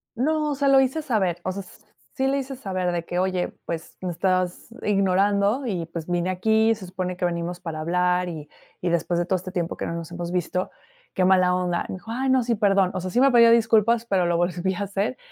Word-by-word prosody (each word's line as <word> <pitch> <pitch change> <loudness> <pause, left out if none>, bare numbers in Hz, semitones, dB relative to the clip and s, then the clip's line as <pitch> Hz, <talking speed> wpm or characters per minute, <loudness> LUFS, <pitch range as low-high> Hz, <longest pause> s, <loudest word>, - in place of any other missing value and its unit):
No, 300 +3 0
se 280 0 0
lo 270 0 +6
hice 265 +4 +1
saber, 190 - 0
o 185 - -1
sea, 200 +1 -5 0.5
sí 265 0 0
le 275 +1 +1
hice 270 0 -4
saber 185 -6 -2
de 170 -1 -2
que: 175 - -4
"Oye, 185 -1 0
pues, 165 -1 -6
me 180 - -2
estabas 185 0 -1 0.2
ignorando 200 +4 +2
y, 180 -7 -2
pues, 165 -1 -6
vine 175 +1 0
aquí 220 +4 +2
y - - +2
se 200 -4 -10
supone 180 0 -4
que 180 - -1
venimos 175 0 -3
para 165 -3 -6
hablar, 180 +2 +1
y 155 -3 -7 0.3
y 180 - 0
después 170 +1 0
de 175 - 0
todo 185 +1 +1
este 185 +1 -8
tiempo 170 -2 -2
que - - -3
no, - - -3
nos 165 0 -7
hemos 175 0 -5
visto, 180 +1 -1 0.5
qué 185 - +2
mala 185 -1 +4
onda". 180 -1 -1
Me - - -4
dijo: 185 +5 -9
"Ay, 260 +3 -1
no, 260 -2 +3
sí, 235 -1 0
perdón." 195 -3 +3
O 185 - -3
sea, 185 - -4
sí 240 - +1
me 275 0 +5
pidió 235 -1 +7
disculpas, 230 0 +3
pero 190 -5 +1
lo 170 -1 +1
volvió 175 +1 -1
a - - -4
hacer 200 +5 -2
185 Hz, 240 wpm, -24 LUFS, 175-225 Hz, 0.5 s, pidió